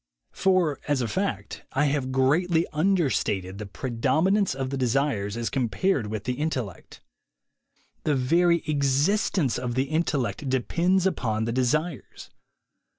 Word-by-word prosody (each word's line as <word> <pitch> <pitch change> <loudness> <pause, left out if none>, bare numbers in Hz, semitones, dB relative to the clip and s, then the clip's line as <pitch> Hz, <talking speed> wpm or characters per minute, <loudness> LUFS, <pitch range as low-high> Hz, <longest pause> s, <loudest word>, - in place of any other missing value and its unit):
For 185 -6 +1
as 145 -3 +1
a - - -1
fact, 110 - -3
I 140 +2 +2
have 140 -2 0
greatly 160 +6 +2
understated 140 - 0
the 105 - -6
pre 125 +6 -5
dominance 175 - +2
of 135 -1 -3
the - - -1
desires 125 -5 0
as 120 -1 -2
compared 125 - 0
with 110 -1 -4
the 125 - -1
intellect. 130 - -4 1.0
The 150 - +1
very 170 +6 +3
existence 145 - +1
of 125 -1 -3
the 130 - +2
intellect 150 -4 -1
depends 170 +8 +1
up6n 110 - 0
the 115 - -1
desires. 140 +5 -2
135 Hz, 135 wpm, -26 LUFS, 120-165 Hz, 1.0 s, very